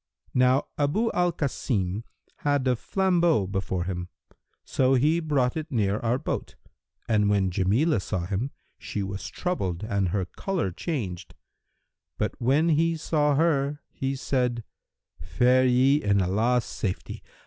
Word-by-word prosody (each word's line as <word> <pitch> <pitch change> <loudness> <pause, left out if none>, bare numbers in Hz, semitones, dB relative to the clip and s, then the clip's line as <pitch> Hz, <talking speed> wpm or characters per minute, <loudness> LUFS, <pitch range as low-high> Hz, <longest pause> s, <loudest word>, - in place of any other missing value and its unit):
Now 125 +1 +3
Abu 205 +11 +1
al 175 0 +2
Kasim 110 - -2 0.3
had 145 -2 0
a 125 - +3
flambeau 175 - +2
before 95 -2 -2
him; 90 -1 -4 0.5
so 130 0 +2
he 150 +6 +3
brought 140 -6 +1
it 160 0 -5
near 105 -4 +1
our 120 +2 +1
boat,[FN#337] - - -5 0.4
and 105 -1 +3
when 100 -2 +2
Jamilah 105 - +2
saw 95 -4 -3
him, 105 +8 -2 0.3
she 100 - -4
was 95 0 -5
troubled 95 - -3
and 100 -4 0
her 95 0 -1
colour 175 - -2
changed: 95 - -4 0.8
but, - - -1
when 140 +7 +3
he 165 +1 +2
saw 150 -2 +1
her, 145 -2 +1
he 135 0 -2
said, 125 -3 -1 0.6
'Fare 125 - +3
ye 130 +4 +4
in 100 -1 +2
Allah's 110 +7 +1
safety. 95 -3 -4
125 Hz, 135 wpm, -26 LUFS, 100-150 Hz, 0.8 s, ye